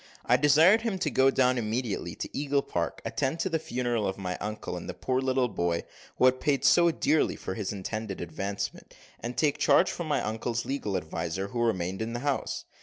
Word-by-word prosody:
I 120 - +5
desired 155 - +6
him 225 -4 -1
to 155 -5 -1
go 130 0 +4
down 130 -2 +3
immediately 115 0 -2
to - - -5
Eagle 140 -1 +1
Park, 85 -2 -3
attend 135 +5 -1
to 190 - 0
the 165 -2 0
funeral 120 -6 -1
of 95 - -3
my 90 -2 -3
uncle, 105 -3 -4
and 90 - -7
the - - -5
poor 130 0 -1
little 130 -1 +1
boy 85 -5 -1 0.3
who - - +4
had 130 0 +4
paid 145 -3 +1
so 170 -1 +6
dearly 160 -1 +1
for - - -5
his 100 0 -3
intended 105 0 -4
advancement, 95 +4 -5 0.2
and 120 +1 -5
take 145 +1 +2
charge 180 - +4
from 170 - -5
my 150 - +1
uncle's 115 +2 -2
legal 120 -8 -2
adviser, 90 +3 -3
who 120 +3 -2
remained 95 -4 0
in 115 +1 -3
the 120 - -3
house. 140 -1 -2
120 Hz, 205 wpm, -28 LUFS, 100-140 Hz, 0.3 s, desired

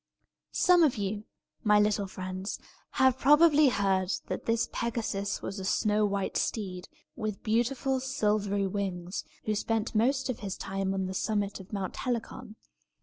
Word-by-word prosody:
Some 360 -1 +5
of 300 -6 +4
you, 205 +1 -3 0.4
my 210 -1 +5
little 210 -1 +2
friends, 185 +1 -5 0.4
have 260 -1 +3
probably 295 +1 +6
heard 195 -4 +1 0.2
that - - -4
this 230 0 +2
Pegasus 220 -4 -2
was 195 +1 -4
a - - -5
snow 210 +2 +2
white 200 -1 -1
steed, 185 -4 -3 0.3
with 215 -4 -4
beautiful 250 +4 +1
silvery 210 -6 0
wings, 185 -2 -3 0.2
who 215 - +1
spent 220 +1 -1
most 260 +5 +2
of 255 - -3
his 200 -3 -5
time 195 0 -2
on 190 -1 -1
the 185 - -4
summit 205 0 -1
of 190 +1 -12
Mount 195 -3 -4
Helicon. 240 -2 -4
210 Hz, 150 wpm, -29 LUFS, 195-240 Hz, 0.4 s, probably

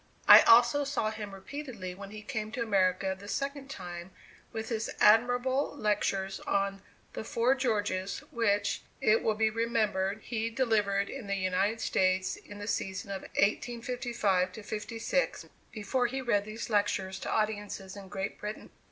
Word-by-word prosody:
I - - +12
also 240 +5 +6
saw 275 -6 -1
him 215 -2 -6
repeatedly 195 -2 -7
when 195 +1 -9
he 215 +1 -9
came 215 -2 -4
to 235 - -1
America 190 -2 +1
the 200 +2 -12
second 275 +3 -3
time 175 -7 -7 0.4
with 225 0 -5
his 225 -2 -2
admirable 245 +6 +3
lectures 195 -3 0
on 195 0 -1 0.3
"The - - -5
Four 235 +3 +2
Georges," 205 -7 -1
which, 205 -3 +1 0.2
it 215 +1 +4
will 220 - +1
be 220 0 +2
remembered 215 -3 0
he 230 -1 -2
delivered 210 -5 +1
in 260 -6 -7
the 200 - 0
United 195 +4 0
States 185 0 +1
in 205 - -12
the 205 - -6
season 195 -1 -3
of 195 - -4
1855 230 -4 0
56, 225 - -2 0.3
before 230 +4 0
he 265 +3 -3
read 220 -6 +1
these 220 +2 -6
lectures 195 -2 0
to - - -5
audiences 205 -3 -2
in 200 -1 -9
Great 195 0 -4
Britain. 210 +1 -6
215 Hz, 150 wpm, -30 LUFS, 195-235 Hz, 0.4 s, I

